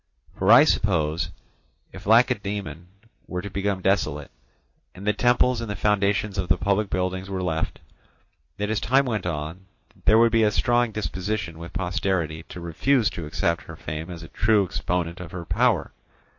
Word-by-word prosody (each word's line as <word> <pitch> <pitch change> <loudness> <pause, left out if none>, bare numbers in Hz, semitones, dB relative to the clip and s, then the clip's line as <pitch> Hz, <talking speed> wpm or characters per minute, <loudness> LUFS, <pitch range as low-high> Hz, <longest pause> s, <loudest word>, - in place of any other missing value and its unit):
For 95 +3 +3
I 120 +5 +10
suppose 85 - +1 0.6
if - - -11
Lacedaemon 100 - +1 0.4
were 90 0 -4
to 100 - -6
become 100 -1 -2
desolate, 80 -7 0 0.6
and 95 +2 -9
the 105 - +3
temples 120 +2 +2
and 115 - -5
the 105 - -3
foundations 100 -1 +1
of 95 - -3
the - - +4
public 100 +1 0
buildings 95 +1 -2
were 95 -1 -3
left, 80 -2 -2 0.8
that 105 +1 -2
as 110 - 0
time 135 +4 +3
went 110 -7 -2
on 80 +3 -5 0.4
there 110 - +6
would 115 0 +5
be 115 0 +3
a 110 - +4
strong 120 +2 +2
disposition 100 -4 -3
with 85 +1 -8
posterity 90 -3 -1
to - - -8
refuse 105 - +1
to 80 -3 -6
accept 85 +2 -1
her - - -9
fame 80 +3 -6
as 85 -2 -8
a 85 - -11
true 105 -1 +2
exponent 90 0 -2
of 90 -2 -9
her 85 -2 -6
power. - - +1
95 Hz, 170 wpm, -24 LUFS, 85-105 Hz, 0.8 s, I